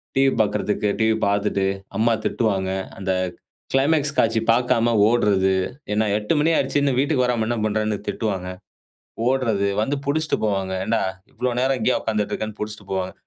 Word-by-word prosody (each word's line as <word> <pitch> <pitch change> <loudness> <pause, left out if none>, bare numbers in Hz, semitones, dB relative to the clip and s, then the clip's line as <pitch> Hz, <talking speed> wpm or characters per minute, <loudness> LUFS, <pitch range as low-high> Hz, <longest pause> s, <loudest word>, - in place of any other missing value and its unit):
TV 135 0 +4
பார்க்கறதுக்கு 105 0 0
TV 110 0 +3
பார்த்துட்டு 100 -1 +1 0.3
அம்மா 115 +1 +3
திட்டுவாங்க. 95 -5 0 0.3
அந்த 95 -1 -1 0.6
கிளைமேக்ஸ் 145 +1 +2
காட்சி 115 0 +3
பார்க்காம 120 -1 +2
ஓடுறது. 100 -5 +3 0.4
ஏன்னா 110 +1 +2
8 105 0 -1
மணி 155 +3 +3
ஆயிடுச்சு 140 +2 +1
இன்னும் 140 -3 +1
வீட்டுக்கு 140 -2 +2
வராம 120 -3 0
என்ன 120 0 -1
பண்ணுறேன்னு 110 0 0
திட்டுவாங்க? 95 -5 -2 0.8
ஓடுறது 115 -7 +1
வந்து 135 +6 0
பிடிச்சுட்டு 155 +2 0
போவாங்க. 95 -2 -1
ஏன்டா 115 0 +1 0.3
இவ்ளோ 125 0 -1
நேரம் 135 0 +2
இங்கேயே 125 +3 +1
உட்காந்துட்டு 105 -2 -1
இருக்கேன்னு, 110 0 -4
பிடிச்சுட்டு 105 -2 -6
போவாங்க. 95 -1 -2
110 Hz, 150 wpm, -22 LUFS, 105-130 Hz, 0.8 s, TV